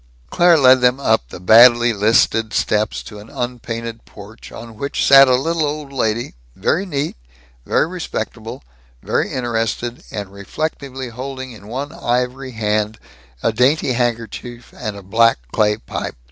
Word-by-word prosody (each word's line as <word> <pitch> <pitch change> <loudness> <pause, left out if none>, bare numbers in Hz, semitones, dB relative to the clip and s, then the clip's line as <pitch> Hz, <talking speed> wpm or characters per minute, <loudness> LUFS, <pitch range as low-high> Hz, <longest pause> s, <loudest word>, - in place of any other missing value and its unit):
Claire 175 -1 +5
led 130 -2 +6
them 125 +2 +3
up 110 - +1
the - - -9
badly 120 +4 +6
listed 110 +1 +2
steps 105 0 0
to 105 - -10
an 105 +2 -13
unpainted 115 -3 -5
porch 105 +2 -13
on 115 -1 -10
which 140 +6 -2
sat 135 0 +8
a 130 - +4
little 160 +5 0
old 145 -1 -4
lady, 115 -2 -1 0.2
very 180 - 0
neat, 145 -3 -3 0.5
very - - +2
respectable, 175 - -6 0.4
very - - -1
interested, 120 -1 -2
and 100 -2 -6
reflectively 130 +4 -5
holding 130 +2 -7
in 105 -3 -13
one 135 +6 -5
ivory 125 -1 -2
hand 105 -1 -1 0.5
a - - +2
dainty 130 +3 +2
handkerchief 120 0 -4
and 110 -5 -5
a 100 - -10
black 115 +4 +3
clay 105 -1 +2
pipe. - - -6
120 Hz, 145 wpm, -19 LUFS, 110-135 Hz, 0.5 s, sat